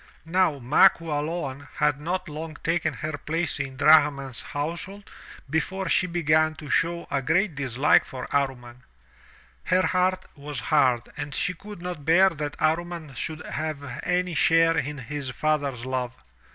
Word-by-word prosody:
Now 165 -3 +2
Ma 130 +2 +6
Qualoan 150 -3 -4
had 145 0 +1
not 185 +4 -2
long 155 0 -7
taken 165 -1 +1
her 150 +2 -5
place 165 +2 -2
in 135 -1 -4
Drahman's 140 -4 +4
household 170 +7 -5 0.4
before 175 +5 -1
she 185 - +3
began 155 -2 +2
to 150 -3 -8
show 170 +2 +1
a 140 - +1
great 165 +7 +1
dislike 135 0 +3
for 130 -1 -7
Amman. 125 -3 -2 0.8
Her 185 0 +3
heart 185 0 +1
was 145 -2 -6
hard 130 -3 +2
and 145 - -4
she 180 - +1
could 200 0 -11
not 180 -5 -5
bear 175 +5 +5
that 150 -3 -4
Amman 165 -1 -1
should 155 +5 -5
have 155 -1 -4 0.2
any 180 0 0
share 165 +2 +4
in 150 -1 -2
his 140 +2 -5
father's 140 -2 -1
love. 130 -1 -3
155 Hz, 150 wpm, -25 LUFS, 140-170 Hz, 0.8 s, Ma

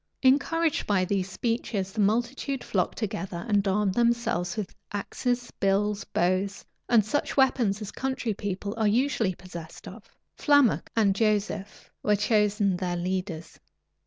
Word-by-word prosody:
Encouraged 295 +4 +2
by 190 -3 +2
these 190 0 -1
speeches, 220 -2 -2
the 220 - -6
multitude 240 +5 0
flocked 185 -4 -1
together, 195 -4 -4
and 205 -2 +2
armed 195 0 +1
themselves 235 -6 +1
with 205 -3 -4 0.2
axes, 245 +4 -2
bills, 200 +1 +1
bows, 185 +3 0 0.2
and 225 -4 +5
such 290 +7 -1
weapons 235 -6 +2
as 200 - -6
country 260 -4 -2
people 200 0 -4
are 220 -2 +2
usually 225 -4 +1
possessed 170 -3 -10
of. 210 +3 -11 0.3
Flammoc 285 -5 +3
and 210 -4 +4
Joseph 210 -1 -1
were 210 - +3
chosen 210 -2 +2
their 180 -1 -2
leaders. 180 -2 -4
205 Hz, 135 wpm, -27 LUFS, 190-235 Hz, 0.3 s, and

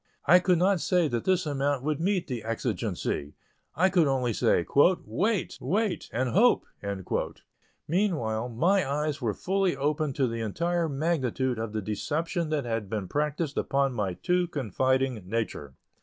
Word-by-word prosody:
I 180 +5 +7
could 180 -1 +2
not 185 0 +2
say 180 -3 +2
that 120 -2 -2
this 185 -2 +2
amount 140 -2 -1
would 150 0 -1
meet 185 +1 +1
the 120 -5 -5
exigency; 105 -9 -3 0.4
I 185 +6 +3
could 175 -5 +4
only 130 -4 +1
say, 85 - +2 0.4
"wait, 210 -2 -1
wait, 195 - -1
and 125 +2 0
hope." 230 - +4 1.2
Meanwhile, 145 - 0
my 165 - +2
eyes 150 0 -1
were 110 -4 -1
fully 190 -3 0
opened 150 0 0
to 135 - +2
the 115 -1 -3
entire 170 +9 -1
magnitude 135 -5 -1
of 115 -1 -3
the 110 -1 -3
deception 160 - -2
that 150 -4 -1
had 115 -4 -3
been 105 -3 -3
practised 150 - -1
upon 135 -1 +1
my 100 -6 -2
too 180 - +1
confiding 130 - 0
nature. 105 -11 -3
145 Hz, 155 wpm, -28 LUFS, 120-175 Hz, 1.2 s, I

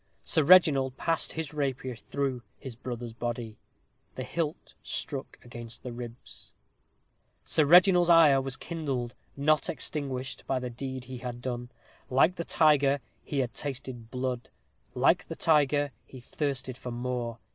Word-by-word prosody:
Sir 160 - +2
Reginald 140 -6 +6
passed 165 -1 0
his 160 -2 -4
rapier 135 -3 -2
through 135 +1 -3 0.2
his 130 - -8
brother's 120 -1 -6
body. 120 -2 -4 0.6
The - - -4
hilt 160 -2 -3
struck 140 -4 -4
against 120 -1 -8
his 125 - -5
ribs. 120 0 -9 0.9
Sir 155 - +3
Reginald's 180 +2 +7
ire 155 -5 +7
was 135 0 -2
kindled, 135 -8 -3 0.2
not 150 +2 +3
extinguished, 135 -4 -3
by 135 - +1
the 125 -1 -4
deed 130 +1 -5
he 130 0 -8
had 120 -1 -5
done. 120 -1 -4 0.4
Like 135 +8 +4
the 170 - -3
tiger, 145 -3 +4 0.2
he 145 - -4
had 125 -2 -3
tasted 130 -4 -5
blood 125 -1 -3 0.5
like - - +3
the - - -5
tiger, 145 -2 +3 0.2
he 130 - -11
thirsted 130 -1 -3
for 125 - -6
more. 120 -1 -3
130 Hz, 145 wpm, -29 LUFS, 125-150 Hz, 0.9 s, Reginald's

